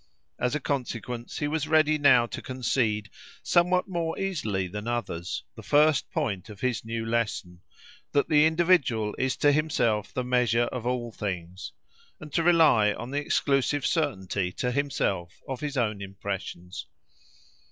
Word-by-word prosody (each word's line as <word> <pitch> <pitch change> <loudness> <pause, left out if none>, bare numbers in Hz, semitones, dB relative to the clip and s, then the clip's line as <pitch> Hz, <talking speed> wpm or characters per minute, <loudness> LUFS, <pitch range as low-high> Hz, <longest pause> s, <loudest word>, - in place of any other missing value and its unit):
As 125 +4 0
a - - 0
consequence, 125 -4 -4
he 150 - -1
was 155 0 -1
ready 155 -1 +3
now 130 -5 +6
to - - -6
concede, 115 -5 -1 0.3
somewhat 180 +2 +3
more 170 -3 -2
easily 130 - -1
than 105 +4 -6
others, 115 -8 -3
the - - -9
first 150 -1 +3
point 100 -1 -2
of 105 -2 -11
his 125 -3 -1
new 115 0 -4
lesson, 110 -6 -2 0.5
that 140 - +2
the 150 0 +5
individual 160 - +2
is 130 0 0
to 145 - +4
himself 120 -9 +1
the 125 - -2
measure 125 -2 +2
of 120 -2 -4
all 120 -2 -2
things, 95 -3 -5 0.5
and 150 -1 -11
to 170 - +2
rely 160 -11 +5
on 120 +3 -7
the 145 - 0
exclusive 140 0 +1
certainty 100 - -1
to 125 - -1
himself 100 -10 -1
of 130 -2 -4
his 145 -1 -4
own 105 -4 0
impressions. 95 -2 -6
125 Hz, 150 wpm, -27 LUFS, 105-150 Hz, 0.5 s, now